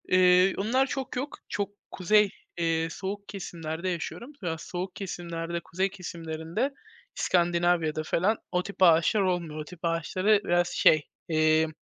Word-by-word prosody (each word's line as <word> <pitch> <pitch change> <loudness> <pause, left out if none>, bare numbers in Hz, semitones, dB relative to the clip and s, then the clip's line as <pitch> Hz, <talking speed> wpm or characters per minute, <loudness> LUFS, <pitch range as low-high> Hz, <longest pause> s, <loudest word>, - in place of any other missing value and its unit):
Eee, 185 +1 +5
onlar 245 +7 +2
çok 270 -1 -4
yok, 270 +4 -4
çok 200 -1 -2 0.2
kuzey, 210 +3 +3 0.3
eee, 165 -1 +1
soğuk 200 +2 -5
kesimlerde 170 -3 -4
yaşıyorum. 185 - -5
Ya, 170 -4 -2
soğuk 180 +3 -5
kesimlerde, 170 -3 -4
kuzey 185 +3 -1
kesimlerinde, 165 - -4 0.4
İskandinavya'da 170 -3 +2
falan 190 +7 +1
o 180 0 +1
tip 200 - -8
ağaçlar 170 +4 +5
olmuyor. 175 -5 -1
O - - -3
tip 180 +2 -12
ağaçları 185 +5 +2
biraz 175 -1 +2
şey, 155 -3 +4 0.3
eee, 155 0 +3
175 Hz, 135 wpm, -28 LUFS, 165-195 Hz, 0.4 s, Eee